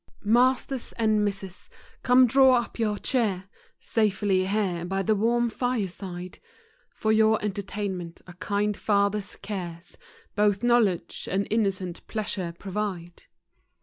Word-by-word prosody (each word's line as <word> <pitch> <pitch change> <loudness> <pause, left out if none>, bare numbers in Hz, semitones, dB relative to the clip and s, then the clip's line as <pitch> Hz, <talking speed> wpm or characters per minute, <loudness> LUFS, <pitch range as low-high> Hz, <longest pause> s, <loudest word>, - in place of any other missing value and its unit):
PIASTERS 250 +3 +2
and 215 -2 +2
Misses, 195 -2 -5 0.3
come 255 0 +6
draw 260 +1 +5
up 235 0 -7
your 210 -2 0
chair 210 -8 0 0.4
Safely 205 -3 +1
all 190 +1 -2
here 190 -5 0
by 195 +2 -2
the 220 - +2
warm 235 +3 +2
fire 240 -2 -1
side 180 -1 -8 0.5
5 - - -36
For 220 - +1
your 220 0 +4
entertainment, 195 -4 -4
a 180 - -11
kind 205 +3 -1
father's 200 -1 0
cares 180 -4 -7 0.3
Both 205 -1 +2
knowledge 235 -7 +1
and 195 +2 0
innocent 195 -5 -1
pleasure 205 -5 -3
provide. 190 -3 -5
205 Hz, 130 wpm, -26 LUFS, 190-220 Hz, 0.5 s, come